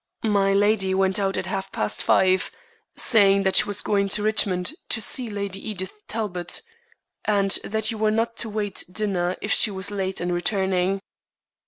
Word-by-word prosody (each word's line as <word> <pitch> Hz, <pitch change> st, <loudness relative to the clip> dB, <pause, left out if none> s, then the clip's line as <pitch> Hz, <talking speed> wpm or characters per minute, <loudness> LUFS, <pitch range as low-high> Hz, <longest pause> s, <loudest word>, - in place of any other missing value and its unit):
"Milady 200 Hz, -1 st, +2 dB
went 190 Hz, +1 st, +2 dB
out 195 Hz, -1 st, 0 dB
at -, -, -2 dB
half 195 Hz, 0 st, -4 dB
past 105 Hz, -, -1 dB
five, 185 Hz, 0 st, +3 dB, 0.5 s
saying 200 Hz, -4 st, +4 dB
that 190 Hz, -1 st, +1 dB
she -, -, +6 dB
was 205 Hz, -1 st, +1 dB
going 200 Hz, -1 st, +1 dB
to 205 Hz, +1 st, +1 dB
Richmond 205 Hz, -1 st, +1 dB, 0.2 s
to -, -, +1 dB
see 240 Hz, +2 st, +1 dB
Lady 200 Hz, 0 st, -5 dB
Edith 190 Hz, -3 st, -5 dB
Talbot, 195 Hz, -, -4 dB, 0.6 s
and 200 Hz, -2 st, +1 dB
that 220 Hz, +1 st, 0 dB
you 220 Hz, -, -6 dB
were 215 Hz, 0 st, +2 dB
not 225 Hz, +2 st, 0 dB
to 230 Hz, -, -2 dB
wait 205 Hz, -2 st, -3 dB
dinner 185 Hz, -3 st, -1 dB
if 210 Hz, -, -2 dB
she -, -, +4 dB
was 195 Hz, 0 st, -2 dB
late 190 Hz, -2 st, -3 dB
in 175 Hz, 0 st, -2 dB
returning." 190 Hz, +1 st, 0 dB
200 Hz, 170 wpm, -24 LUFS, 190-215 Hz, 0.6 s, she